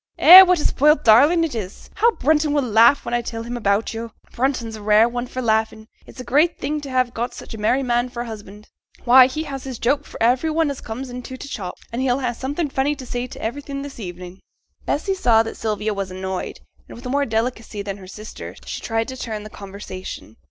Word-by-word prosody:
'Eh! 365 +3 +11
what 365 -2 +4
a - - -3
spoilt 300 +3 +3
darling 285 +10 +5
it 325 - -2
is. 205 -5 -7
How 470 - +3
Brunton 300 +1 +1
will 290 -2 +1
laugh 235 +3 +4
when - - -4
I 240 - +1
tell 230 -1 -6
him 240 +1 -6
about 210 -1 0
yo'; 230 +1 -5 0.2
Brunton's 245 -3 -2
a 215 - -10
rare 210 +2 +4
one 245 +1 -4
for 255 +1 -5
laughin'. 220 -1 0 0.2
It's - - -14
a - - -5
great 300 +7 +2
thing 300 +1 -3
to 280 - -8
have 255 -2 0
got 240 +2 -4
such - - -10
a 220 - -8
merry 250 +6 +1
man 240 0 0
for 240 -1 -5
a - - -9
husband. 210 -2 -11 0.3
Why! 255 +1 +8
he 305 +4 -4
has 275 -4 -7
his 260 -3 -6
joke 280 +6 0
for - - -11
every 250 +7 +2
one 315 -1 +1
as 275 - -8
comes 250 +3 -7
into 250 +1 -8
t' 280 - -9
shop; 195 -9 -6 0.2
and 240 - -2
he'll 260 0 +1
ha' 245 -2 -1
something 285 +5 -3
funny 275 +3 0
to 265 - -10
say 245 0 -4
to - - -11
everything 275 +4 -5
this 285 -3 -9
evenin'.' 180 -1 -8 0.5
Bessy 385 +7 0
saw 235 -12 +3
that 225 - -7
Sylvia 215 -1 -2
was 195 -1 -4
annoyed, 185 0 -5 0.3
and, - - -10
with 240 - -13
more 280 +3 0
delicacy 225 -2 -3
than 200 0 -5
her 190 -2 -12
sister, 215 +3 -9
she - - -6
tried 225 0 -2
to 260 - -6
turn 220 -4 -5
the 215 - -10
conversation. 190 - -9
240 Hz, 235 wpm, -21 LUFS, 220-275 Hz, 0.5 s, Eh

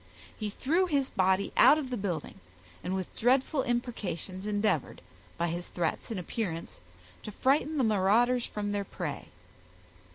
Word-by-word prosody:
He 215 -2 -3
threw 330 - +1
his 280 -5 0
body 190 +1 +2
out 300 - +7
of 270 -4 -4
the - - 0
building, 185 - -4 0.4
and 185 - -2
with 185 -2 -5
dreadful 265 +4 +2
imprecations 210 - -3
endeavored, 205 -7 0 0.4
by 170 +1 0
his 175 +2 -4
threats 170 +5 -2
and 220 -5 -3
appearance, 175 - -4 0.4
to 215 - -7
frighten 290 +7 +1
the 265 - +3
marauders 225 +4 +3
from 205 -1 -3
their 205 0 -1
prey. - - -5
210 Hz, 150 wpm, -30 LUFS, 185-255 Hz, 0.4 s, out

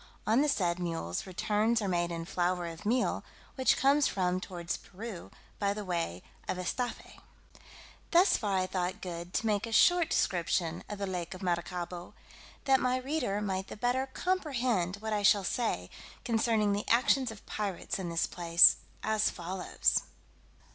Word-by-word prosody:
On 225 +5 +3
the 300 - +2
said 180 -8 +1
mules 165 - -3
returns 210 +5 +1
are 205 - -2
made 175 -2 0
in 165 -1 -4
flour 180 0 0
of 170 +4 -7
meal, 245 +3 +1 0.3
which 260 -1 +3
comes 280 +2 +4
from 185 -1 0
towards 175 -3 -4
Peru, 200 -1 -9 0.3
by 200 0 +1
the 210 -1 -5
way 165 - -2 0.2
of - - -2
Estaffe. 240 +7 -4 0.9
Thus 355 +3 +5
far 200 -3 0
I 185 - +1
thought 185 -1 -2
good 175 -1 -6
to - - 0
make 210 0 +1
a - - -7
short 350 +8 +5
description 170 -1 0
of 210 - -5
the 200 - -2
lake 180 -1 -4
of 185 - -10
Maracaibo, 175 0 -3 0.5
that 270 -1 +5
my 255 0 +1
reader 255 -6 -1
might 190 -2 -2
the - - -8
better 250 +4 0
comprehend 255 - 0
what 220 +1 -4
I 210 - 0
shall 200 0 +5
say 185 - -2 0.3
concerning 225 -3 +2
the 205 - -3
actions 250 +2 +3
of 220 -2 -10
pirates 200 -3 -3
in 180 -2 -3
this 165 0 +1
place, 170 -1 +6 0.3
as 215 0 +2
follows. 180 +1 0
200 Hz, 165 wpm, -31 LUFS, 175-230 Hz, 0.9 s, place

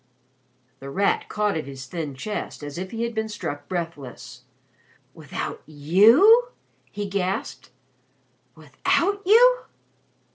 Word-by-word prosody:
The 135 - -8
Rat 195 +7 0
caught 210 -1 0
at 155 -3 -4
his 135 -1 -8
thin 150 0 -5
chest 205 +1 -6
as 145 +3 -6
if 185 0 -5
he 230 +2 -4
had 235 0 -3
been 220 -1 -2
struck 145 -8 -6
breathless. 165 -8 -6 0.7
"Without - - -6
you?" 220 - +5 0.4
he 205 -1 -4
gasped. 195 -1 -3 0.9
"Without 245 - -1
you?" - - +5
190 Hz, 115 wpm, -24 LUFS, 145-230 Hz, 0.9 s, you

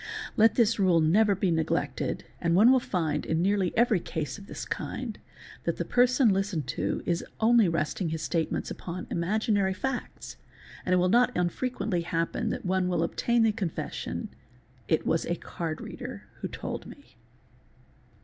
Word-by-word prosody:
Let 225 +1 +5
this 225 -2 +3
rule 185 -4 +4
never 200 +6 +4
be 190 -1 +1
neglected 160 -4 -1 0.2
and 170 -1 +2
one 220 +7 +7
will 260 - +5
find, 175 -10 -1
in 160 - 0
nearly 190 0 +2
every 230 -4 +4
case 160 +2 -4
of 200 - -13
this - - -6
kind, - - -4 0.5
that - - 0
the - - -2
person 250 0 +4
listened 195 -5 0
to - - -2
is 170 -1 0 0.2
only 225 -3 +5
resting 165 +2 -1
his 160 0 -3
statements 165 -2 -1
upon 180 +1 -6
imaginary 195 +2 +1
facts, 265 +5 -4 0.5
and 185 - +3
it - - +5
will 180 0 +3
not 245 +4 +3
unfrequently 180 +1 -1
happen 165 0 -1
that - - -4
one 185 0 +1
will 175 -2 +1
obtain 235 +7 +1
the 225 - +4
confes 195 -7 -3
sion—'"'it 125 +5 -5
was 165 - +1
a 170 - 0
card 165 -2 -5
reader - - -7 0.2
who - - -3
told - - -6
me." - - -15
185 Hz, 165 wpm, -28 LUFS, 165-220 Hz, 0.5 s, one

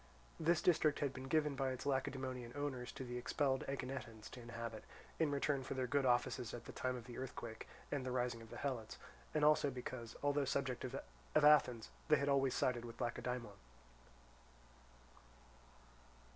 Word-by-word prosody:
This 165 +1 +3
district 155 -4 +4
had 140 -2 0
been 130 0 -6
given 150 0 +3
by 135 -1 +1
its 130 +1 -4
Lacedaemonian 130 -3 -1
owners 135 -4 -2
to - - -5
the 125 -1 -4
expelled 135 +2 +1
Aeginetans 125 -5 -5
to 125 - -8
inhabit, 115 -2 -5 0.4
in 160 -2 +4
return 140 -1 +1
for 130 - -4
their 130 -1 0
good 135 +1 +2
offices 120 -1 +1
at 120 - -8
the - - -7
time 130 0 -1
of 120 -2 -7
the 120 -1 -7
earthquake 120 -3 -6 0.2
and 140 -3 0
the 130 - -2
rising 125 -2 0
of 115 - -11
the - - -7
Helots; 125 -6 -3 0.4
and 150 -1 +4
also 150 -1 +5
because, 125 -2 -6
although 145 0 +3
subjects 130 -2 -1 0.5
of 155 -1 +6
Athens, 125 -6 +5 0.2
they 155 - +7
had 140 -1 +1
always 135 -2 +3
sided 120 -2 +1
with 115 -1 -8
Lacedaemon. 120 -2 -2
130 Hz, 170 wpm, -39 LUFS, 120-140 Hz, 0.5 s, they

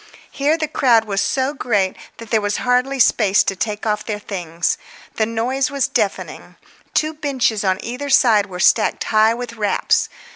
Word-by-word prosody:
Here 295 +3 +1
the 310 -1 -2
crowd 240 -7 +3
was 200 -2 -1
so 265 +1 0
great 205 -9 0 0.2
there 225 -1 -1
was 205 0 -1
hardly 250 +2 0
space 210 -5 +3
to 195 - -2
take 210 +2 -4
off 210 -1 -1
their 210 -2 -4
things; 175 -5 -3 0.4
the 220 - +1
noise 250 +5 -1
was 280 -2 0
deafening. - - -3 0.4
Two 310 0 +1
benches 265 -8 -1
on 190 -1 +1
either 250 +5 -5
side 225 -6 +4
were 180 -2 -8
stacked 215 +3 +2
high 220 +1 +3
with 240 -1 -6
wraps. 210 -3 0
225 Hz, 170 wpm, -19 LUFS, 205-265 Hz, 0.4 s, side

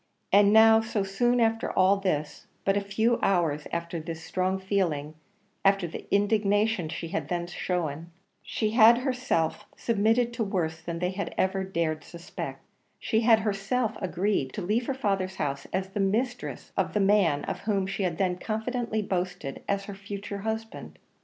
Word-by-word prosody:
And 205 0 +6
now 220 +1 +7
so 220 -2 -1
soon 240 +6 +1
after 225 -1 +1
all 190 +2 +4
this 155 -7 -2 0.2
but 195 - +3
a 200 - +1
few 220 +4 +1
hours 165 -6 +1
after 170 0 -3
this 160 0 -6
strong 185 +3 -1
feeling 180 -7 -1 0.5
after 195 -2 +3
the 165 - -8
indignation 205 -2 +2
she 165 +1 -5
had 160 -3 -3
then 175 0 -2
shown, 170 -2 -3 0.3
she 215 -2 -2
had 230 +1 +7
herself 250 - -1
submitted 230 +2 +2
to 235 -1 -1
worse 165 -5 -2
than 170 0 -4
they 180 +2 -1
had 195 -2 -4
even 190 0 0
dared 160 -3 0
to - - -17
suspect; 170 0 -7 0.3
she 220 - 0
had 225 -1 +5
herself 210 +3 -1
agreed 185 -7 -1
to 200 - -4
leave 220 +6 0
her 270 - -1
father's 195 -6 -1
house 140 -4 -3
as 190 +1 -2
the 195 - -4
mistress 240 +6 -1
of - - 0
the - - +3
man, 195 -7 +3
of - - -4
whom 200 -3 0
she 195 +1 -3
had 175 -4 -1
then 180 -1 0
confidently 220 +1 -2
boasted 180 -7 -3
as 200 0 0
her 200 - -7
future 200 0 -6
husband! 220 +2 -5
195 Hz, 170 wpm, -27 LUFS, 175-220 Hz, 0.5 s, now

